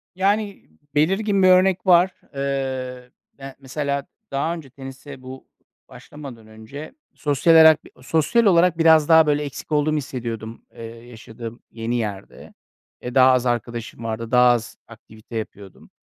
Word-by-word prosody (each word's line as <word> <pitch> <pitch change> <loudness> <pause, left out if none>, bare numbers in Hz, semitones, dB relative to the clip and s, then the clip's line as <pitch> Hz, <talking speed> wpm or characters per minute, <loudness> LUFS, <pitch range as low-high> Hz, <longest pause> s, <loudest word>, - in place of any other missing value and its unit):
Yani, 200 +2 -1 0.3
belirgin 195 +5 +1
bir - - +6
örnek 185 +1 +4
var. 180 +1 +5 0.2
Eee, - - -5
ı 130 -2 -4 0.3
ya, 135 -1 -10
mesela 140 +1 -3 0.3
daha 140 +5 -1
önce 160 -6 -9
tenise 135 0 -11
bu 130 +1 -11 0.4
başlamadan 130 -7 -12
önce 110 +8 -11 0.2
sosyal 150 +2 +2
alak 160 -1 +7 0.2
sosyal 160 - +1
olarak 175 -2 +4
biraz 160 -2 +4
daha, 160 -1 +6
böyle, 150 0 +1
eksik 145 +2 -8
olduğumu 150 +1 +1
hissediyordum, 115 -4 -6
ııı, 115 - -11 0.2
yaşadığım 115 0 -10
yeni 115 +1 -4
yerde. 105 -5 -6 0.5
Eee, 125 0 -7
daha 130 0 +6
az 130 -1 +1
arkadaşım 120 -1 -4
vardı. 115 +1 -5
Daha 125 0 +5
az 120 -2 -3
aktivite 110 0 -14
yapıyordum. 100 -3 -9
135 Hz, 140 wpm, -21 LUFS, 120-160 Hz, 0.5 s, alak